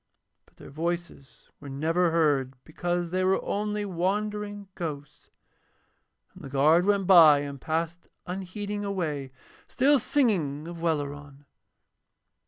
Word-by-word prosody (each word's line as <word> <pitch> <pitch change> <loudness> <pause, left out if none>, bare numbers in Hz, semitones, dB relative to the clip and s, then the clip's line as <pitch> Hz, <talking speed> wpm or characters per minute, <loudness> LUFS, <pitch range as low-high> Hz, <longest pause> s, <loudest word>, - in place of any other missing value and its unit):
But - - -28
their - - -12
voices 170 -2 -5
were 145 - -10
never 165 +6 +1
heard 145 -5 +1
because 175 +1 -3
they 185 +1 0
were 190 +1 +2
only 210 0 -2
wandering 205 +2 -2
ghosts. 150 -4 -7 1.0
And - - -14
the 135 - -7
guard 155 +7 +3
went 200 -2 +2
by 160 -6 +7
and 140 -2 -7
passed 165 +2 -3 0.2
unheeding 200 +3 -5
away, 155 -9 -3 0.4
still 280 +2 +3
singing 170 - 0
of 170 -1 -8
Welleran. 145 -3 -3
170 Hz, 120 wpm, -27 LUFS, 145-195 Hz, 1.0 s, by